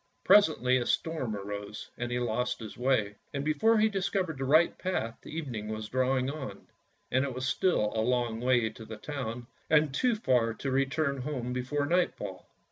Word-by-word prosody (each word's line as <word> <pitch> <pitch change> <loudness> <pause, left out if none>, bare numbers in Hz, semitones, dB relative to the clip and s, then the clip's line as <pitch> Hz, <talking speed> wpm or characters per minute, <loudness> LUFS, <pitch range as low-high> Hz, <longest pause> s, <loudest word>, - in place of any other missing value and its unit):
Presently 155 -11 +5
a 120 - -1
storm 145 -10 -1
arose, 100 +1 -6
and 120 0 -4
he 120 - 0
lost 125 0 -1
his 110 -2 -8
way; 115 -6 +1 0.2
and 140 0 -2
before 220 +10 +3
he 215 +1 +5
discovered 190 -6 -1
the 135 - -1
right 155 +5 +4
path 115 -12 -3
evening 130 -10 -5
was 110 0 -5
drawing 130 +1 +1
on, 140 -1 -6 0.5
and 130 +1 +3
it 135 -3 -3
was 130 0 -3
still 130 - +1
a 110 - +1
long 120 -1 0
way 125 -3 +2
to 115 - -11
the 110 0 -8
town, 120 -3 -5 0.2
and 150 -3 +4
too 245 - +2
far 125 - +1
to 135 - -3
return 140 +2 +1
home 125 -3 -3
before 130 +3 -1
nightfall. 175 +3 -1
130 Hz, 180 wpm, -30 LUFS, 115-155 Hz, 0.5 s, Presently